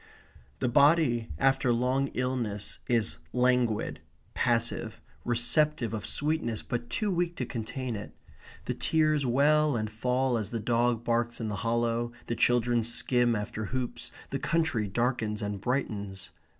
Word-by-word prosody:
The - - +2
body 135 -3 +4
after 135 -2 +3
long 130 +3 +1
illness 120 -5 -2
is 115 -2 +1
languid, 125 -3 +1 0.3
passive, 115 -1 0 0.2
receptive 120 +2 +2
of 110 0 -4
sweetness, 145 -4 -1
but 120 -1 -4
too 210 -2 -1
weak 175 -1 0
to 125 - -3
contain 120 +1 -4
it. 105 +1 -7 0.5
The - - -1
tears 155 -3 +1
well 150 +3 +3
and 110 -1 -2
fall 125 +3 0
as 105 -2 -4
the 115 - -3
dog 120 +1 +1
barks 120 0 0
in 110 -2 -3
the 100 - -3
hollow, 115 +1 0
the 120 - -2
children 120 0 +3
skim 120 +1 +2
after 110 +1 -4
hoops, 125 +2 -4 0.2
the - - -1
country 160 -10 0
darkens 115 0 -1
and 100 -1 -3
brightens. 105 -6 -3
120 Hz, 140 wpm, -29 LUFS, 115-130 Hz, 0.5 s, body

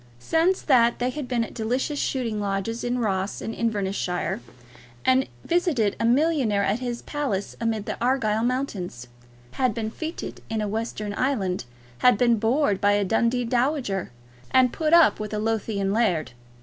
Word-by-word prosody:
Since 330 - +1
that 240 -4 +4
they 250 +1 0
had 290 -1 -5
been 245 -2 0
at - - -7
delicious 255 +6 -1
shooting 235 -5 -1
lodges 200 +3 -2
in 245 +1 0
Ross 195 -4 -1
and 225 - -4
Inverness 205 -5 -1
shire, 180 -10 -2 0.6
had 260 0 +3 0.2
visited 315 - +1
a - - +1
millionaire 250 -5 +2
at 200 +4 +1
his 245 -1 -4
palace 270 -10 -3
amidst 225 -2 -1
the - - -4
Argyle 225 -4 +1
mountains, 210 - -3 0.4
had 255 -5 0
been 220 -1 -3
fêted 320 +7 -6
in 225 -1 -1
a 210 - -1
western 215 -1 -3
island, 200 - -1 0.3
had 250 -4 +5
been 235 -1 +3
bored 225 -2 +1
by 205 0 +4
a 205 -1 +2
Dundee 235 +4 +1
dowager, 245 - 0 0.4
and 255 -1 +4
put 310 -1 0
up 335 -2 +6
with 215 0 -4
a - - -1
Lothian 210 -3 -1
laird. 195 - +1
230 Hz, 165 wpm, -25 LUFS, 205-255 Hz, 0.6 s, up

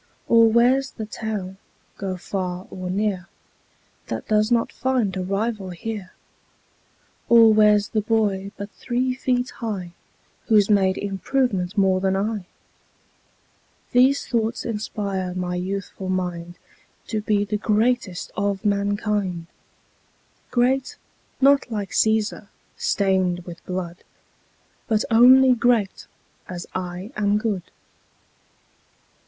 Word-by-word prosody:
Or 230 -1 +6
where's 250 +4 +3
the 220 - -5
town, 210 -3 -5 0.4
go 190 -2 -4
far 180 0 -4
or 185 -1 -6
near, 190 -2 -1 0.8
That - - -5
does 215 +1 +2
not 235 -1 +2
find 250 -7 0
a 190 - -2
rival 200 +1 -2
here? 195 +1 -6 1.2
Or 230 -2 +7
where's 210 -1 +4
the 215 - 0
boy 205 -3 0
but 200 +1 -7
three 255 +1 -1
feet 250 0 -1
high 200 -7 -5 0.6
Who's 215 -2 +4
made 190 -2 +3
improvement 200 -1 -1
more 190 -1 +3
than 190 0 +1
I? 205 -1 -2 1.4
These 260 +3 +4
thoughts 230 -1 -1
inspire 200 -5 -3
my 180 -1 -2
youthful 190 +1 -4
mind 175 -2 -3 0.5
To 215 -2 -1
be 210 -1 +1
the 210 +1 -2
greatest 215 -2 0
of 200 0 -2
mankind: 200 -3 0 1.0
Great, 260 +2 +1 0.4
not 275 -1 +4
like 205 -3 -3
Cæsar, 220 -1 +1 0.3
stained 185 -3 +1
with 170 -1 -10
blood, 180 -2 -4 0.9
But 220 -2 +1
only 255 +3 +7
great 235 -4 +1 0.4
as 175 -1 -6
I 185 +3 -5
am 205 0 +2
good. 210 -5 -3
205 Hz, 115 wpm, -23 LUFS, 185-225 Hz, 1.4 s, Or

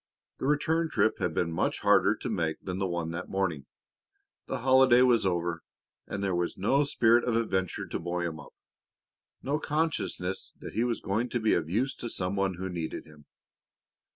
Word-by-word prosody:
The - - -2
return 160 +3 +1
trip 110 - +1
had 85 -3 -1
been 85 -1 0
much 80 - -1
harder - - +4
to - - -6
make 80 -2 -1
than 90 0 -4
the 95 - 0
one 85 -2 -3
that 85 +2 -5
morning. 85 -8 -2 0.8
The - - -3
holiday 130 -1 +6
was 120 -5 +4
over 85 -2 -1 0.5
and 100 - -4
there 95 -2 0
was 85 0 -1
no 135 +9 +2
spirit 120 -3 +4
of 120 - 0
adventure 95 -5 -1
to - - -4
buoy 85 +1 -2
him 80 -2 -4
up, 75 - -13 0.9
no 145 +3 0
consciousness 150 - -2
that - - -9
he 115 - +1
was 120 -2 -1
going 110 +5 -1
to 120 - -1
be 110 -1 +2
of 80 -2 0
use 125 +9 0
to 120 - -5
some 95 -1 -2
one 95 -2 0
who 95 +2 -4
needed 85 -3 -5
him. 75 -2 -17
95 Hz, 190 wpm, -29 LUFS, 85-120 Hz, 0.9 s, holiday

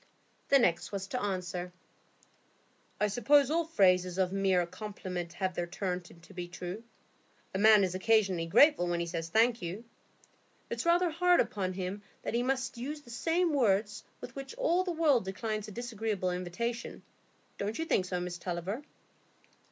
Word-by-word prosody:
The 280 - +7
next 175 -10 +1
was 195 -1 -3
to 250 - -2
answer,— 180 -3 -3 1.3
"I 210 - +3
suppose 255 +7 +4
all 335 +1 +2
phrases 185 - +3
of 185 -1 +1
mere 190 -3 +2
compliment 180 -2 -6
have 190 -1 -2
their 175 0 -2
turn 180 0 -3
to 175 +1 -16
be 180 -1 -5
true. 180 +3 -6 0.7
A 190 - -1
man 215 -1 +7
is 185 -2 0
occasionally 190 -3 +2
grateful 280 - +5
when 175 0 0
he 170 - -1
says 165 -1 -4
'Thank 230 +5 +3
you.' 180 +6 -5 0.9
It's - - -2
rather 345 0 +4
hard 355 +2 +4
upon 185 -3 0
him 190 +2 -4 0.2
that - - -3
he 235 - +2
must 260 -1 -1
use 295 +5 -5
the 240 - -14
same 330 +7 +1
words 210 -6 +1 0.2
with 245 - -9
which 275 +10 -7
all 370 -8 +2
the 365 - -2
world 310 - +3
declines 215 +2 -3
a - - -8
disagreeable 220 -5 -2
invitation, 185 +7 -4 0.6
don't 205 +2 -2
you 325 - -2
think 190 - +1
so, 180 -1 -2
Miss 175 0 -5
Tulliver?" 180 - -3
200 Hz, 165 wpm, -31 LUFS, 180-250 Hz, 1.3 s, The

